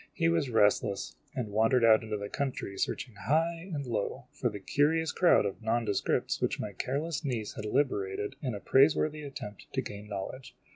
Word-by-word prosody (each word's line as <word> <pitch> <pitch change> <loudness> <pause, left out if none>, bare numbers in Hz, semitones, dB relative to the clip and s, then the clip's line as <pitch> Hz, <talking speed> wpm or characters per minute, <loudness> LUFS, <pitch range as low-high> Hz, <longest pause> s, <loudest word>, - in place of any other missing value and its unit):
He 165 -1 +2
was 165 -5 +1
restless, 105 -3 +2 0.2
and 115 -5 -3
wandered 115 +3 +4
out 110 -1 +7
into 110 -1 -3
the 100 0 -5
country 130 -6 -3
searching 120 +4 -2
high 165 - 0
and 145 -4 -3
low 120 +3 -2
for 120 - -1
the 105 -2 -7
curious 155 +9 +2
crowd 180 - +4
of 100 +3 -4
nondescripts 110 -2 0
which - - 0
my 105 -1 -4
careless 145 - -2
niece 120 -7 -2
had 105 - -6
liberated 105 -3 0
in 125 -6 -2
a - - -5
praiseworthy 150 +5 +3
attempt 135 -8 -8
to - - +1
gain 105 +1 -8
knowledge. 120 +5 -6
120 Hz, 180 wpm, -30 LUFS, 105-145 Hz, 0.2 s, out